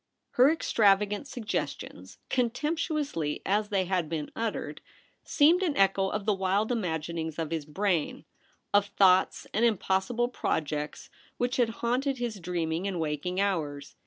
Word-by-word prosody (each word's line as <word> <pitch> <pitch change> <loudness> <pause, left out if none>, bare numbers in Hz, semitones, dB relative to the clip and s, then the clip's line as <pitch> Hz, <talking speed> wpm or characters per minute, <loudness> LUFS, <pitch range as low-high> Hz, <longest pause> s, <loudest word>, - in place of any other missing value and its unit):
Her 255 +3 +5
extravagant 210 -6 +2
suggestions, 240 -6 -5
con 250 -2 +2
temptuously 295 - -2
as 205 +2 +1
they 195 -2 +1
had 180 -4 -1
been 155 -3 -4
uttered, 225 -1 -3 0.4
seemed 330 +5 +4
an 335 -6 0
echo 195 0 +3
of 210 0 -3
the 215 - +3
wild 195 +4 0
imaginings 160 -6 -2
of 165 -2 -3
his 160 -3 -2
brain 175 -1 -1 0.2
— - - -40
of 205 0 +4
thoughts 190 -2 +3
and 220 - +1
impossible 225 +2 +1
projects 150 -9 -3 0.3
which 245 +1 -1
had 240 -3 +3 0.2
haunted 260 +3 0
his 235 -4 -3
dreaming 170 0 -2
and 185 -3 -3
waking 160 +4 -2
hours. 150 -8 -2
195 Hz, 145 wpm, -28 LUFS, 165-235 Hz, 0.4 s, Her